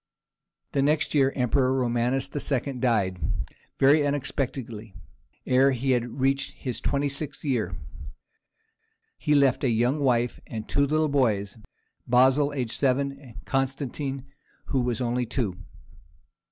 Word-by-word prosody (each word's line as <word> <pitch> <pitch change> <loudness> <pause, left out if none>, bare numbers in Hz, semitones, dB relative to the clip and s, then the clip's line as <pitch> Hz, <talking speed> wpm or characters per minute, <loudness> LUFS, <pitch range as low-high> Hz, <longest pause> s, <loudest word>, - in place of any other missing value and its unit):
The 140 - +1
next 150 +2 +1
year 135 -3 +4
the - - -11
emperor 130 +1 +2
Romanus 125 +2 0
II. 140 -1 -1
died, 105 -8 +1 0.6
very 145 +3 +5
unexpectedly, 125 -6 -3 0.5
ere 130 +2 +4
he 130 +2 0
had 120 +1 -1
reached 135 +1 +1
his 125 -5 -5
twenty 140 0 0
sixth 140 +1 -4
year. 110 -10 -1 1.4
He 150 - +2
left 140 -3 +3
a 130 - +3
young 120 +6 +1
wife, 125 -3 +1
and 110 -1 -6
two 140 0 +2
little 155 +2 +2
boys, 115 -7 0 0.5
Basil, 130 +4 +4
aged 125 -5 -3
seven, 140 0 +2
and 140 -4 -13
Constantine, 135 0 -2 0.4
who 135 - +1
was 125 0 -1
only 120 0 -1
two. 115 -6 -2
130 Hz, 130 wpm, -26 LUFS, 120-140 Hz, 1.4 s, very